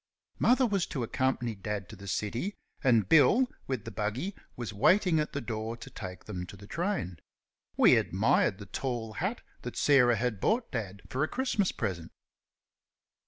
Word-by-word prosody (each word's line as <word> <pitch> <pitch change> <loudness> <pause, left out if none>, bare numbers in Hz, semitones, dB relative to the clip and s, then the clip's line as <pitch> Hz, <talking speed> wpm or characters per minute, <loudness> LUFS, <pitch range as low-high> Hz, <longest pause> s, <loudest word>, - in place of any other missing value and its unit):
Mother 255 +2 +4
was 200 -6 0
to 130 - -3
accompany 125 -1 0
Dad 100 -1 -4
to - - -9
the 100 - -11
city, 115 - -2 0.3
and 115 -7 +4
Bill, 165 - +6 0.2
with 130 -6 -3
the 115 - -6
buggy, 110 - -2 0.2
was 120 -3 -5
waiting 180 - +4
at 150 - -2
the 140 - -2
door 110 -1 -4
to - - -10
take 90 -3 -8
them 90 -4 -5
to 100 - -10
the 100 - -12
train. 165 - -2 0.6
We - - +7
admired 105 +1 +2
the 105 - -9
tall 115 0 -3
hat 190 - -2 0.2
that 120 - -6
Sarah 125 -5 +5
had 115 -2 -1
bought 230 +2 +1
Dad 100 -5 -4
for 135 +3 -1
a - - +1
Christmas 245 -6 0
present. 90 -7 -4
120 Hz, 170 wpm, -30 LUFS, 105-155 Hz, 0.6 s, We